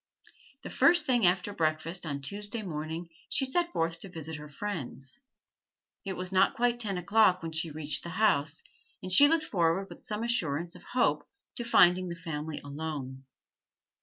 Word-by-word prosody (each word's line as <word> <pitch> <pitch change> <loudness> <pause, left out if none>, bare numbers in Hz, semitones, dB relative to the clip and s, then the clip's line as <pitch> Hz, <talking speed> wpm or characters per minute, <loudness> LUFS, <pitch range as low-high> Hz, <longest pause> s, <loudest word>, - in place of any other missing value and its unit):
The - - -7
first 345 -2 +4
thing 245 -8 +4
after 185 +3 +1
breakfast 165 0 -1
on 140 -2 -4
Tuesday 205 - -4
morning 160 -1 -5 0.2
she 270 - +2
set 345 +6 +1
forth 165 - -1
to 195 - -9
visit 160 -3 -5
her 150 0 -10
friends. 145 -5 -5 0.8
It 195 - -4
was 185 0 -4
not 190 +1 +3
quite 240 0 +1
ten 200 -5 -1
o'clock 185 -1 +3
when 165 - -4
she 160 +1 0
reached 150 0 0
the 170 - -7
house, 155 -8 +1 0.4
and 185 - -3
she 285 +10 +9
looked 315 0 +2
forward 180 - 0
with - - -11
some 210 +1 -4
assurance 170 -8 0
of - - -10
hope 250 0 0 0.3
to 240 - -2
finding 185 -5 +4
the 170 - -5
family 160 -2 -5
alone. 140 -3 -6
175 Hz, 170 wpm, -29 LUFS, 155-210 Hz, 0.8 s, she